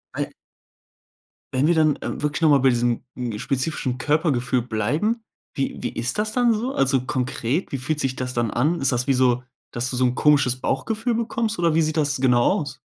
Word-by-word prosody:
Ei - - -1 1.3
Wenn 135 +4 +2
wir 175 - +3
dann, 155 -2 +3
ähm, - - -4
wirklich 150 +2 -1
noch 160 - +5
mal 145 - +6
bei 135 0 +4
diesem 120 0 0 0.3
spezifischen 130 0 -2
Körpergefühl 135 -4 +1
bleiben, 150 - -1 0.3
wie 135 - -2
wie - - -2
ist 125 - -2
das 215 +1 -1
dann 245 -2 +3
so? 240 +5 -2
Also 135 -1 +2
konkret, 130 +4 -2
wie 135 - -2
fühlt 150 +4 -2
sich 130 -1 -1
das 125 0 -4
dann 120 -3 0
an? 150 +8 +1
Ist 135 - +2
das 125 +2 -1
wie 135 - +4
so, 125 -1 +2 0.3
dass 120 +2 -2
du 125 - -3
so 130 - +1
'n 125 0 +1
komisches 145 -4 +3
Bauchgefühl 220 - -1
bekommst 230 -1 -1
oder 170 -2 +2
wie 165 - +3
sieht 155 +1 -1
das 145 -2 +1
genau 125 -2 +3 0.2
aus? 145 - -6
135 Hz, 205 wpm, -23 LUFS, 125-160 Hz, 1.3 s, mal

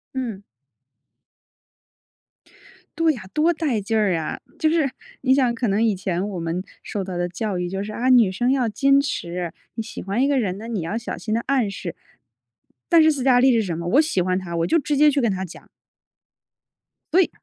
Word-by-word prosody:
嗯。 230 -7 -4 2.6
对 330 -1 +4
呀， 245 - -8
多 310 +3 +3
带 290 -10 -1
劲 220 +3 -1
儿 205 -4 +2
啊。 160 - -4 0.2
就 310 - +3
是， 315 -4 +2 0.3
你 260 0 +3
想 255 -3 +3
可 230 0 -1
能 200 +3 +1
以 215 -3 +2
前 185 +1 -2
我 185 - -5
们 165 +2 -3 0.2
受 200 - -4
到 185 -2 -5
的 175 - 0
教 185 +2 -3
育 180 0 -2
就 195 +1 -3
是， 215 - -6
啊， 250 +4 -1
女 235 -7 +6
生 245 +6 +1
要 255 -4 +1
矜 275 +5 +3
持， 175 - -3 0.2
你 225 - -3
喜 235 - -8
欢 200 +7 0
一 - - +3
个 280 -2 +2
人 195 -5 -1
呢， 225 +2 -8
你 220 -6 -2
要 200 +8 -3
小 235 - -5
心 215 - -4
地 230 - +1
暗 260 -7 +2
示。 185 -3 -6 0.9
但 335 - +6
是 315 - +5
斯 270 -4 -3
嘉 255 -2 +5
丽 260 +1 +5
是 230 - +3
什 175 -4 -3
么？ 170 +1 -4
我 270 - +5
喜 305 - 0
欢 185 +1 0
他， 170 -2 -6
我 165 +1 +1
就 - - +3
直 290 +1 -1
接 300 +1 +6
去 280 - +1
跟 230 -4 +2
他 190 0 -3
讲。 170 - -13 1.5
对！ 365 0 +5
225 Hz, 225 characters per minute, -22 LUFS, 185-270 Hz, 2.6 s, 女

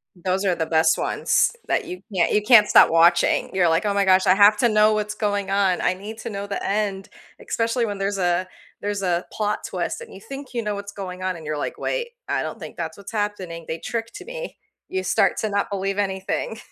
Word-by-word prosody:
Those 185 +2 -1
are 185 -3 +2
the 160 - -1
best 160 0 +3
ones - - +1 0.2
that 420 - 0
you 360 +1 -7
can't 175 -2 +2
you 210 - +3
can't 210 -1 +7
stop - - +7
watching. 170 +1 +3
You're 180 -3 +3
like, 165 +6 +1
"Oh 205 - +1
my 200 -1 +2
gosh, 185 0 +4
I 185 - +6
have 205 +2 +6
to 240 - +3
know 215 0 +4
what's 210 0 -1
going 205 -2 -1
on. 195 -3 +2
I 185 - +2
need 210 +4 -8
to - - -5
know 200 0 -5
the 200 - -4
end." 200 -1 -1 0.4
Especially 230 +1 0
when 205 -2 -4
there's 195 0 -1
a 180 0 +1 0.3
there's 205 -1 -2
a 175 -1 0
plot 210 0 -1
twist - - -3
and 475 - -11
you - - -10
think 270 +4 -9
you 235 -2 -2
know 210 -1 -2
what's 200 0 -7
going 185 -2 -7
on 185 -1 -1
and 160 -2 -10
you're 150 0 -3
like, - - -4
"Wait, 475 -1 -2 0.2
I - - 0
don't - - -5
think - - -9
that's 160 0 -5
what's 200 +1 -10
happening, 195 -6 -3
they 160 - -3
tricked 230 0 -5
me." - - -7 0.3
You 380 0 -3
start - - +2
to 215 - -1
not 200 +1 -1
believe 195 0 -2
anything. 195 +2 -2
200 Hz, 235 wpm, -23 LUFS, 185-215 Hz, 0.4 s, can't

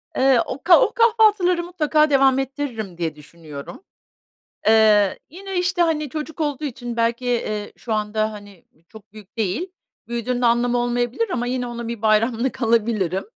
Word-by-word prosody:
Eee, 265 -2 +4
o - - -7
ka 345 +1 +7
o 455 -3 +2
kahvaltıları 430 -7 +3
mutlaka 310 -3 +1
devam 270 -2 +4
ettiririm 260 - -5
diye 165 -3 -3
düşünüyorum. 150 - -11 0.8
Eee, 215 -3 +4
yine, 385 +4 -8
işte, 360 0 0
hani, 310 -3 0
çocuk 310 +3 -6
olduğu 295 -1 -2
için 245 -3 -6
belki, 235 +2 0
eee, 215 -4 -2
şu 230 - -4
anda, 215 0 -1
hani, 205 -4 -13
ııı, 160 - -32
çok 215 -2 -16
büyük 215 +1 -15
değil, 225 - -2 0.4
büyüdüğünde 240 +1 -2
anlamı 240 +1 +2
olmayabilir 240 - -1
ama 245 -9 -2
yine 250 0 -2
ona 235 -1 -6
bir 230 -2 -6
bayramlık 225 +4 +1
alabilirim 220 -5 +1
240 Hz, 155 wpm, -21 LUFS, 215-300 Hz, 0.8 s, ka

